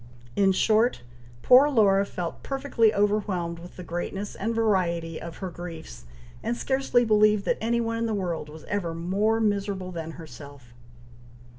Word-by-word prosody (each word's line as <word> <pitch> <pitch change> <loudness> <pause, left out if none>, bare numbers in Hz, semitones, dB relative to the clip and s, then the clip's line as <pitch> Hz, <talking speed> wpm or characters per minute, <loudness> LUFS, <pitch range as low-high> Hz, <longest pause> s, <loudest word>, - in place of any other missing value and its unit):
In 195 -1 +4
short, 215 - +2 0.4
poor 260 +4 +7
Laura 200 -6 +3
felt 175 -3 -5
perfectly 270 -5 +1
overwhelmed 200 -5 0
with 175 +1 -12
the 180 - -7
greatness 175 +4 -4
and 225 +3 -3
variety 170 -7 0
of 170 0 -8
her 185 - -5
griefs, 160 - -9 0.4
and 235 +2 -2
scarcely 265 -2 +1
believed 215 -2 +4
that - - 0
any 235 +2 +1
one 230 0 -2
in 230 - 0
the 220 - -1
world 170 -6 -3
was 155 +1 -11
ever 175 -5 -3
more 200 +7 0
miserable 200 -3 -1
than 165 -2 -6
herself. 140 -5 -12
195 Hz, 155 wpm, -26 LUFS, 170-220 Hz, 0.4 s, poor